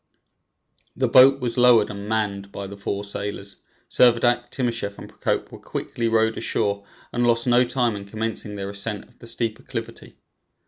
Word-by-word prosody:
The - - +1
boat 135 +1 +7
was 125 0 -1
lowered 120 -4 +6
and 100 0 -7
manned 100 -3 -1
by 100 - -6
the 100 +1 -8
four 100 0 -3
sailors; 100 -1 -5 0.3
Servadac, 120 0 +3
Timascheff 115 -6 -2
and - - -9
Procope - - -2
were - - -10
quickly 115 -1 -3
rowed 110 0 +2
ashore, 100 0 -1 0.3
and 120 0 +2
lost 115 0 +2
no 125 0 +5
time 120 -2 0
in 100 -1 -7
commencing 110 0 -3
their 100 0 -4
ascent 100 +1 -3
of - - -27
the 120 - -10
steep 115 -1 -2
acclivity. - - -7
110 Hz, 170 wpm, -23 LUFS, 100-120 Hz, 0.3 s, boat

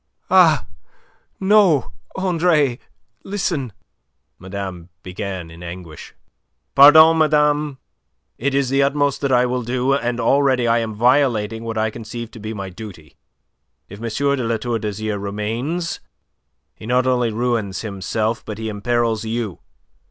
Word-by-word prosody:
"Ah, - - +5 0.7
no, 190 -8 +3 0.2
Andre! 165 -8 +1 0.4
Listen..." 170 - -2 0.7
Madame 95 -2 -7
began 90 -2 -6
in 85 +1 -13
anguish. 85 -2 -9 0.6
"Pardon, 155 +3 +8
madame. 150 -2 +2 0.6
It 135 +3 -1
is 140 -2 +1
the 135 0 +3
utmost 140 0 +1
that 140 -1 0
I 125 -1 +4
will 125 0 -1
do, 125 +3 0
and 120 -3 -1
already 130 -2 +2
I 115 0 +3
am 110 -2 -4
violating 115 -2 +2
what 115 -1 -4
I 110 0 0
conceive 115 +1 -7
to 115 - -11
be 110 +1 -6
my 100 -3 -6
duty. 90 -7 -11 0.7
If 100 - -10
M. 115 - -3 0.3
de 130 - -2
La 115 0 0
Tour 115 +1 -2
d'Azyr 105 0 -3
remains 115 - -3 0.7
he 110 - -11
not 125 +1 +2
only 125 -2 +1
ruins 110 -4 -1
himself, 110 +2 -2
but 105 - -7
he 110 0 -4
imperils 115 +1 -1
you. 110 -4 -3
120 Hz, 135 wpm, -20 LUFS, 105-140 Hz, 0.7 s, Pardon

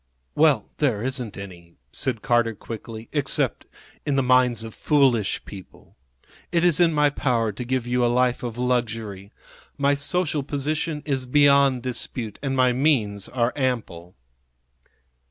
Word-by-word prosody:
"Well, 145 -8 +3
there 120 -8 +1
isn't 125 -4 -3
any," 85 -4 -10 0.2
said 120 - -3
Carter, 120 -3 +2
quickly, 110 +1 -8
"except 145 -3 -1 0.4
in 145 - -1
the 135 - +2
minds 125 -3 +3
of 110 -1 -8
foolish 130 -9 +1
people. 95 -3 -13 0.6
It 170 0 +2
is 175 -3 +3
in 170 -2 +5
my 150 -2 +3
power 120 -6 0
to 105 +5 -6
give 125 0 -2
you 125 0 0
a - - +4
life 125 0 +1
of 120 -2 -5
luxury. 115 -5 -2 0.5
My 140 0 +2
social 150 +1 0
position 150 +2 -3
is 135 -3 -1
beyond 140 -2 +4
dispute, 120 -3 -4
and 135 -1 -2
my 125 -1 +4
means 115 -8 0
are 120 -1 0
ample." 115 -11 -3
125 Hz, 145 wpm, -23 LUFS, 115-140 Hz, 0.6 s, in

